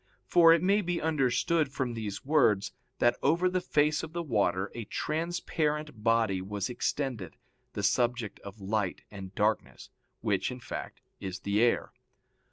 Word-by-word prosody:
For 165 -1 +6
it 165 0 +4
may 200 +3 +3
be 175 -2 -1
understood 150 0 +1
from 130 -4 -2
these 110 -2 -5
words 130 -9 +3 0.2
that 120 0 +3
over 170 +6 +3
the 185 0 0
face 150 -3 +2
of 160 0 -8
the 170 0 -2
water 100 - 0
a 115 -2 -6
transparent 155 - -2
body 115 -5 +2
was 100 +4 -3
extended, 120 - -2 0.4
the - - -4
subject 120 -3 +1
of 100 +2 -11
light 100 -1 -2
and 95 -2 -9
darkness, 105 +1 -1 0.3
which, 100 -4 0
in 125 0 -6
fact, - - -7 0.2
is 95 0 -5
the 100 +2 +1
air. 120 0 +2
120 Hz, 155 wpm, -29 LUFS, 105-155 Hz, 0.4 s, For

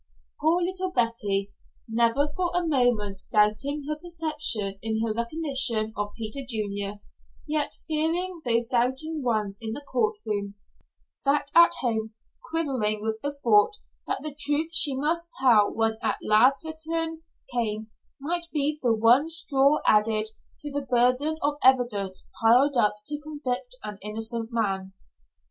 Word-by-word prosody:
Poor 335 +3 +2
little 370 +1 -2
Betty, 210 - 0 0.4
never 235 +5 +2
for 360 -1 0
a 355 -1 +1
moment 245 -9 +1
doubting 225 +8 +1
her 305 - -1
perception 305 - -1
in 220 0 -2
her 225 -1 -1
recognition 235 -3 0
of 205 0 -3
Peter 230 +5 -5
Junior, 205 -4 -4 0.5
yet 300 -1 0
fearing 330 +3 -1
those 235 -1 +1
doubting 260 +6 0
ones 215 -5 -1
in 220 -1 -4
the 290 - -6
court 430 - 0
room, 200 -1 -3 0.5
sat 280 0 -1
at 340 0 +7
home, 220 -3 -1 0.3
quivering 255 -10 0
with 220 0 -2
the 285 0 -3
thought 220 - +4 0.3
that - - -2
the 305 -2 -4
truth 295 +2 -1
she 285 -5 +6
must 330 +5 -1
tell 230 -6 +5
when 225 0 0
at - - 0
last 255 +8 +4
her 315 - -3 0.2
turn 325 -1 -1 0.3
came 220 -2 -2 0.3
might 340 +4 -2
be 300 0 0
the 235 -3 +2
one 240 +8 +4
straw 295 -3 +2
added 215 0 +3 0.3
to 295 - -5
the 280 -1 -4
burden 250 +6 +2
of 290 0 0
evidence 240 -8 +2
piled 250 +5 +5
up 210 -4 +3
to 295 0 -3
convict 295 - -4
an 210 -1 -7
innocent 225 +2 -3
man. 195 -4 -2
250 Hz, 145 wpm, -26 LUFS, 220-300 Hz, 0.5 s, at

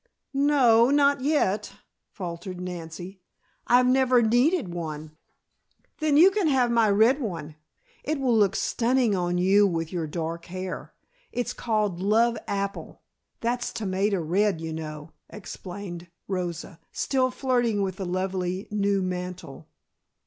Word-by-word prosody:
"No, 265 -5 +4
not 280 -1 +3
yet," 215 -9 0 0.4
faltered 175 0 -7
Nancy. 180 +1 -7 0.5
"I've 250 +1 +5
never 255 -1 +4
needed 245 - +2
one." 155 -2 -6 0.8
"Then, 305 -2 +2
you 360 +5 +8
can 395 -4 +1
have 255 -4 +2
my 230 -2 +3
red 225 +8 +4
one. 165 - -5 0.5
It 310 -1 -2
will 255 -3 +2
look 200 -3 +3
stunning 240 -2 +1
on 175 -1 -1
you 195 +3 +4
with 165 -2 -3
your 165 -3 -2
dark 165 +1 -4
hair. 185 +1 -6 0.4
It's 245 - -2
called 210 -6 -1
love 225 +5 +3
apple, 200 0 -4 0.4
that's 240 +1 -1
tomato 195 -2 -1
red, 185 +3 +1
you 160 0 -5
know," 155 0 -7 0.2
explained 180 -3 -8 0.2
Rosa, 175 -2 -4
still 260 -2 0
flirting 245 -5 0
with 190 -1 -3
the 195 - -4
lovely 185 +1 -2
new 200 -2 +1
mantle. 180 -5 -6
200 Hz, 130 wpm, -26 LUFS, 175-245 Hz, 0.8 s, you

